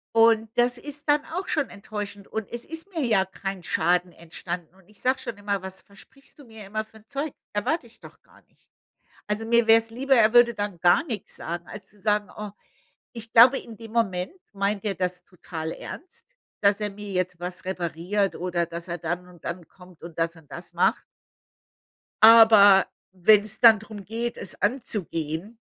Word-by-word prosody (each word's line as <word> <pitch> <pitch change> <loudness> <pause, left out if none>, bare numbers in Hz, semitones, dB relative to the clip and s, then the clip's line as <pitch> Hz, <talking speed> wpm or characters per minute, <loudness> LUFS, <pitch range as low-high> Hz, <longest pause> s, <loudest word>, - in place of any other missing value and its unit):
Und 225 -1 +5
das 245 0 +3
ist 290 +1 -9
dann 295 0 +3
auch 360 +4 -5
schon 295 -5 0
enttäuschend 205 0 -7
und 220 -2 -5
es 240 0 -6
ist 325 +5 -6
mir 310 -6 0
ja 200 -5 +3
kein 195 0 -6
Schaden 175 +2 +1
entstanden 170 +1 -7
und 190 0 -24
ich 210 - -13
sage 260 +1 +1
schon 235 -4 -6
immer, 200 -1 -2
was 190 0 -8
versprichst 270 +9 -18
du 285 - -13
mir 220 -3 -12
immer 215 +2 -3
für 220 0 -19
'n 220 0 -21
Zeug? 280 +3 -3 0.2
Erwarte 245 +8 -1
ich 235 - -15
doch - - -15
gar - - -23
nicht. - - -33 0.6
Also, 210 +2 -2
mir 235 0 +3
wär's 225 0 +5
lieber, 265 +3 +2
er 220 -2 +4
würde 240 -1 +6
dann 205 -4 -4
gar 175 - +4
nix 225 - -5
sagen, 170 +1 -6
als 205 -2 -10
zu 205 - -20
sagen 210 -1 0
oh, 210 -1 -6 0.6
ich 225 -1 -10
glaube, 245 +4 +8
in 225 -2 -12
dem 225 0 -11
Moment 200 - -1 0.2
meint 200 0 -1
er 200 - -1
das 180 -1 -3
total 165 -3 -7
ernst, 360 +7 -11 0.3
dass 200 +1 +3
er 210 - -1
mir 205 0 -9
jetzt 180 -1 -2
was 180 +1 -6
repariert 185 +2 -2
oder 175 -1 -1
dass 170 +1 -7
er 175 - -4
dann 175 +2 -4
und 180 -2 -17
dann 170 -1 -5
kommt 180 -2 -18
und 170 -1 -10
das 165 +1 0
und 155 -3 -19
das 175 - -9
macht. - - +2 1.2
Aber 220 -4 +8 0.3
wenn's 210 +3 +3
dann 225 -3 +8
drum 215 -2 -10
geht, 235 +2 -4
es 185 - -7
anzugehen, 205 - -2
205 Hz, 190 wpm, -25 LUFS, 180-230 Hz, 1.2 s, glaube